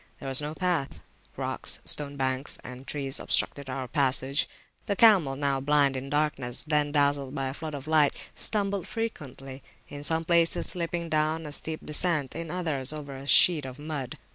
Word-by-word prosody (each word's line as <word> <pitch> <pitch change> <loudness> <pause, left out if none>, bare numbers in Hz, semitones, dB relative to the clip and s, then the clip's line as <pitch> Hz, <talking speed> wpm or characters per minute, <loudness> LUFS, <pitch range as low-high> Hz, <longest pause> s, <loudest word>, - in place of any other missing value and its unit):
There 135 - -7
was 135 +1 +3
no 150 +1 -5
path. 180 -6 -1 0.4
Rocks, - - -2
stone 145 -1 -1
banks, 130 +1 -1
and 125 +2 -10
trees 135 -2 -2
obstructed 140 -2 -1
our 130 0 -4
passage. 135 0 +1 0.4
The 200 - +1
camels, 185 -12 +5
now 140 -1 +1
blind 140 -1 +3
in 130 +1 -5
darkness, 140 -4 0
then 150 -2 +1
dazzled 140 -2 +1
by 135 -1 -1
a - - -5
flood 155 0 -6
of 140 -1 -7
light, 155 -3 +4 0.2
stumbled 200 -3 -1
frequently; 135 - -5 0.3
in 145 0 -8
some 160 +2 +1
places 170 0 +2
slipping 170 -1 -2
down 155 +1 0
a 150 - -6
steep 155 +2 -4
descent, 150 -3 -1
in 165 0 -5
others 150 -7 -2
sliding 150 -1 -1
over - - -7
a 135 +1 -9
sheet 160 0 +7
of 130 -1 -7
mud. 145 -4 -5
145 Hz, 180 wpm, -27 LUFS, 135-160 Hz, 0.4 s, sheet